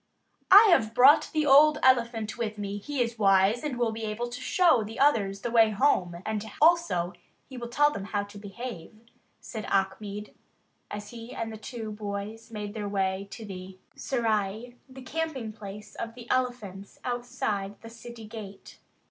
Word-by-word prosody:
"I 405 Hz, +3 st, +10 dB
have 225 Hz, -9 st, +3 dB
brought 275 Hz, +5 st, +6 dB
the 310 Hz, -1 st, +1 dB
old 295 Hz, +2 st, +7 dB
elephant 235 Hz, -4 st, +2 dB
with 220 Hz, -2 st, -3 dB
me; 205 Hz, 0 st, -4 dB
he 270 Hz, +4 st, -1 dB
is 230 Hz, -1 st, -6 dB
wise 195 Hz, +3 st, +4 dB
and 290 Hz, -5 st, -3 dB
will 240 Hz, -2 st, +1 dB
be 225 Hz, 0 st, -6 dB
able 225 Hz, +3 st, -3 dB
to 245 Hz, +1 st, -7 dB
show 320 Hz, -3 st, +3 dB
the 220 Hz, +2 st, -8 dB
others 205 Hz, -9 st, +2 dB
the 240 Hz, -, -3 dB
way 225 Hz, -2 st, +5 dB
home; 190 Hz, -7 st, +1 dB
and, 215 Hz, -1 st, -2 dB, 0.2 s
also, 310 Hz, -, +3 dB, 0.3 s
he 265 Hz, -, -11 dB
will 240 Hz, -1 st, -5 dB
tell 295 Hz, +5 st, +3 dB
them 200 Hz, -8 st, -5 dB
how 205 Hz, 0 st, -2 dB
to 205 Hz, 0 st, -11 dB
behave," 210 Hz, -1 st, -8 dB, 0.5 s
said 220 Hz, -2 st, -7 dB
Achmed, 200 Hz, +2 st, -2 dB, 0.6 s
as 205 Hz, 0 st, -7 dB
he 235 Hz, 0 st, -9 dB
and 225 Hz, -1 st, -4 dB
the -, -, -6 dB
two 220 Hz, -1 st, -7 dB
boys 210 Hz, +2 st, -6 dB
made 210 Hz, -2 st, -6 dB
their 210 Hz, -2 st, -4 dB
way 195 Hz, 0 st, -1 dB
to 225 Hz, +2 st, -9 dB
the 185 Hz, -1 st, -9 dB, 0.2 s
serai, 225 Hz, -1 st, -1 dB
the 260 Hz, 0 st, -11 dB
camping 270 Hz, -6 st, -3 dB
place 210 Hz, -1 st, -10 dB
of 230 Hz, 0 st, -6 dB
the 240 Hz, -1 st, -11 dB
elephants 220 Hz, -7 st, -2 dB
outside 240 Hz, -5 st, -3 dB
the 230 Hz, -, -10 dB
city 230 Hz, 0 st, -10 dB
gate. 210 Hz, -3 st, -10 dB
225 Hz, 175 wpm, -28 LUFS, 205-245 Hz, 0.6 s, I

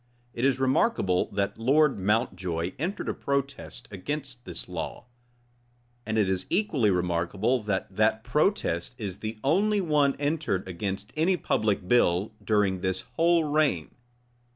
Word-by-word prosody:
It 120 Hz, -, -4 dB
is 135 Hz, -1 st, +3 dB
remarkable, 130 Hz, -, +2 dB
that 100 Hz, +2 st, -1 dB
Lord 135 Hz, +2 st, +3 dB
Mountjoy 95 Hz, -4 st, 0 dB
entered 180 Hz, +7 st, -3 dB
a -, -, 0 dB
protest 140 Hz, -3 st, -3 dB
against 125 Hz, +4 st, -5 dB
this -, -, -5 dB
law; -, -, -5 dB, 1.0 s
and 110 Hz, 0 st, -1 dB
it 105 Hz, -3 st, +3 dB
is 95 Hz, -1 st, -1 dB
equally 160 Hz, -, +2 dB
remarkable 90 Hz, +6 st, 0 dB
that 100 Hz, -2 st, -3 dB
that 110 Hz, +1 st, +2 dB
protest 125 Hz, -, 0 dB
is 100 Hz, -5 st, -4 dB
the 110 Hz, 0 st, -5 dB
only 200 Hz, +9 st, +3 dB
one 150 Hz, -6 st, +2 dB
entered 145 Hz, -, -1 dB
against 100 Hz, +4 st, -4 dB
any 175 Hz, +4 st, +2 dB
public 105 Hz, -, 0 dB
bill 100 Hz, -2 st, +3 dB
during 100 Hz, -4 st, +1 dB
this 95 Hz, 0 st, -1 dB
whole 170 Hz, 0 st, +4 dB
reign. 145 Hz, -, +1 dB
115 Hz, 135 wpm, -27 LUFS, 95-145 Hz, 1.0 s, whole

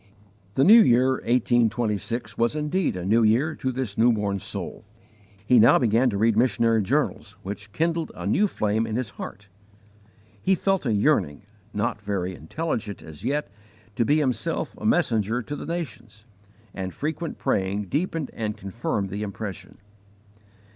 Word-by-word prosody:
The 135 Hz, -, +4 dB
new 225 Hz, +7 st, +9 dB
year 125 Hz, -, +4 dB
1826 120 Hz, -2 st, 0 dB
was 115 Hz, +5 st, +1 dB
indeed 155 Hz, -, 0 dB
a 90 Hz, -, -5 dB
new 110 Hz, +4 st, +3 dB
year 120 Hz, +8 st, +3 dB
to 130 Hz, -, -1 dB
this 125 Hz, -5 st, -4 dB
newborn 105 Hz, -4 st, +2 dB
soul. -, -, -6 dB, 0.6 s
He 125 Hz, +2 st, +5 dB
now 120 Hz, +6 st, +7 dB
began 120 Hz, +1 st, +3 dB
to 100 Hz, -, -2 dB
read 110 Hz, +1 st, +3 dB
missionary 115 Hz, -1 st, +3 dB
journals, 95 Hz, -, -1 dB
which 100 Hz, +2 st, -7 dB
kindled 165 Hz, +5 st, -1 dB
a -, -, -7 dB
new 210 Hz, -, +3 dB
flame 110 Hz, -, 0 dB
in 110 Hz, -, -3 dB
his 125 Hz, -4 st, -2 dB
heart. 100 Hz, +1 st, -9 dB, 0.9 s
He 190 Hz, -, +3 dB
felt 195 Hz, -5 st, 0 dB
a -, -, +2 dB
yearning 75 Hz, -8 st, +1 dB, 0.3 s
not 105 Hz, +1 st, -2 dB
very 95 Hz, -3 st, -2 dB
intelligent 105 Hz, -, -4 dB
as 80 Hz, -2 st, -11 dB
yet 145 Hz, -6 st, -1 dB, 0.4 s
to 120 Hz, -, +2 dB
be 145 Hz, +6 st, +3 dB
himself 130 Hz, -7 st, -1 dB
a -, -, -2 dB
messenger 110 Hz, +2 st, +1 dB
to 145 Hz, -, -5 dB
the -, -, -7 dB
nations, 115 Hz, -, -6 dB, 0.5 s
and 95 Hz, -1 st, -5 dB
frequent 160 Hz, +2 st, -3 dB
praying 100 Hz, +2 st, 0 dB
deepened 155 Hz, -, -2 dB
and 105 Hz, -2 st, -3 dB
confirmed 100 Hz, 0 st, -3 dB
the 100 Hz, +2 st, -4 dB
impression. 105 Hz, -1 st, -6 dB
115 Hz, 155 wpm, -25 LUFS, 105-135 Hz, 0.9 s, new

